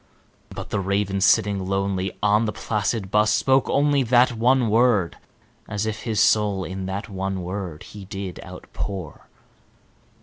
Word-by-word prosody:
But - - -8
the 105 - 0
Raven, 100 0 -1
sitting 100 0 +3
lonely 95 -1 -2
on 105 +2 +3
the 105 - -1
placid 105 -2 -2
bust, 105 +1 +3
spoke 135 -1 +2
only 145 0 +2
That 125 0 +4
one 120 +2 +2
word, 110 -5 +2 0.5
as 105 0 -2
if 110 -1 -4
his 110 -3 -1
soul 105 -3 +3
in 95 +1 -5
that 100 +3 -4
one 95 -2 -4
word 90 -3 -5
he 105 -2 -11
did 95 -2 -6
outpour. 95 -7 -7
100 Hz, 145 wpm, -23 LUFS, 95-110 Hz, 0.5 s, That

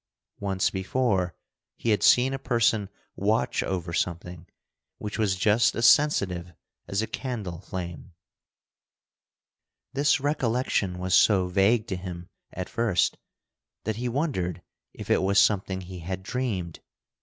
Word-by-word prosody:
Once 95 -2 0
before 95 -2 0 0.4
he 115 - 0
had 105 - +2
seen 130 +2 +5
a 135 - -3
person 115 -5 +1 0.3
watch - - +1
over 90 -3 -3
something 90 0 -3 0.5
which 105 +1 -5
was 100 -4 +2
just 105 +4 +3
as 115 - +1
sensitive 95 - +3 0.3
as 100 +2 -1
a - - 0
candle 105 -10 -5
flame. 90 -3 -7 1.8
This 140 +1 +3
recollection 125 -9 0
was 90 0 -2
so 95 -4 +5
vague 105 +4 +3
to 95 - -3
him 90 -1 -7 0.2
at 90 0 -5
first 110 -7 +1 0.6
that 110 -1 -2
he 125 +1 -2
wondered 120 - -2 0.3
if - - -6
it - - +4
was 100 +1 +1
something 95 -2 +3
he 90 0 -9
had 95 +3 -5
dreamed. 100 -8 -3
100 Hz, 130 wpm, -26 LUFS, 90-115 Hz, 1.8 s, seen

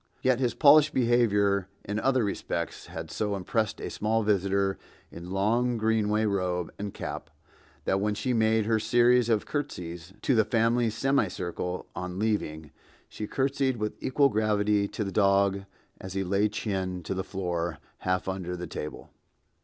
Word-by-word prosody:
Yet 130 -1 +3
his 125 -2 0
polished 150 0 +6
behavior 105 -6 +3 0.2
in 105 +1 -2
other 130 0 +2
respects 85 -4 -3
had 80 -1 -7
so 105 +2 -1
impressed 105 +3 -1
a - - -5
small 110 +1 0
visitor 100 -1 +1 0.3
in 85 +1 -9
long 115 +6 +1
Greenaway 110 -1 +1
robe 90 -4 -1
and 100 0 -4
cap, - - -6 0.6
that 95 - +2
when 105 0 0
she 125 +4 -1
made 110 -1 +2
her 110 0 +2
series 120 +1 +4
of 110 -3 +2
curtsies 90 - -5
to 135 - +3
the 110 -2 +5
family 115 +1 +2
semicircle 100 -7 -1
on 90 0 -5
leaving, 80 -8 -2 0.4
she 105 - -6
curtsied 135 0 0
with 105 -1 -2
equal 140 +2 +3
gravity 105 -2 +1
to 105 - -4
the 100 - -4
dog 100 -1 +2 0.3
as 95 -1 -7
he 95 0 -1
lay 100 +3 +1
chin 95 -4 -3
to 80 - -3
the 95 0 -2
floor, 85 -4 -3 0.2
half 90 0 -1
under 90 -1 -3
the 90 - -5
table. 75 -2 -7
105 Hz, 160 wpm, -28 LUFS, 95-115 Hz, 0.6 s, polished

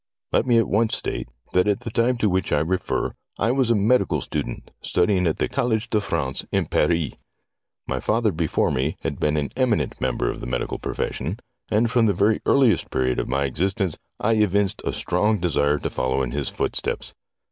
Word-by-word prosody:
Let 125 - +2
me 120 -2 +5
at 115 - +3
once 110 +2 +2
state - - -4 0.3
that 90 +2 +3
at 100 -1 +1
the 115 - -5
time 120 +2 +2
to 115 -3 +1
which 95 -1 0
I 75 - +3
refer 90 +4 -1 0.2
I 115 +4 +2
was 130 -2 +2
a 115 - +4
medical 110 +5 +2
student, - - -5
studying 90 0 +2
at 80 - 0
the - - 0
College 120 -5 -1
de 105 - +2
France 65 -8 -2
in - - +1
Paris. 80 -2 +1 0.7
My - - -2
father 110 0 +1
before 80 -3 0
me 70 +2 -1
had - - -3
been 75 0 +1
an 70 -1 -1
eminent 125 -4 0
member 65 -2 0
of - - -8
the - - -5
medical 60 0 -2
profession, 85 - -3 0.3
and 115 +2 +2
from 120 -3 +4
the 100 - +3
very 105 +4 +2
earliest 130 -5 +4
period 65 -1 0
of - - -2
my 70 +2 +1
existence 90 - -1 0.2
I 115 +1 +2
evinced 100 -2 +2
a - - -1
strong 105 0 +1
desire 75 -4 +2
to - - -3
follow 65 +1 0
in 60 - -3
his 70 +1 -2
foot - - -2
steps. - - -3
95 Hz, 200 wpm, -23 LUFS, 75-110 Hz, 0.7 s, me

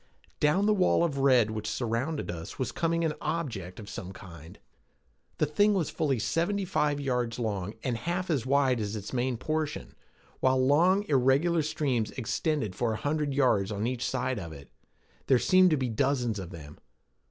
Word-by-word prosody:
Down 165 +7 +3
the 215 - +4
wall 185 -3 +3
of 145 -5 -1
red 125 -5 +4
which 110 -1 -4
surrounded 125 - -2
us 85 -1 -8
was 130 - -2
coming 165 0 0
an 155 - 0
object 110 - -4
of 105 - -9
some 95 -2 -7
kind. 85 -4 -12 0.8
The - - +2
thing 205 +8 +3
was 175 -5 -1
fully 140 -4 0
seventy 175 - 0
five 150 -5 0
yards 125 -4 -1
long 105 -4 -3
and 125 -3 -1
half 175 +9 -2
as 140 -7 +1
wide 130 -3 +2
at 105 0 -3
its 105 +2 -7
main 125 -1 0
portion, 155 +3 -3 0.5
while 130 0 +3
long 170 +10 +4
irregular 140 +5 +3
streams 135 -7 -1
extended 130 - -2
for 115 -2 0
a - - -3
hundred 145 +2 -1
yards 110 -8 +2
on 105 +1 -2
each 125 0 -2
side 130 -2 -1
of 85 -4 -7
it. 70 -3 -12 0.6
There 130 - +5
seemed 185 +9 +5
to 155 - +2
be 130 -2 -1
dozens 120 -2 0
of 90 -3 -7
them. 75 -4 -11
130 Hz, 180 wpm, -28 LUFS, 110-155 Hz, 0.8 s, There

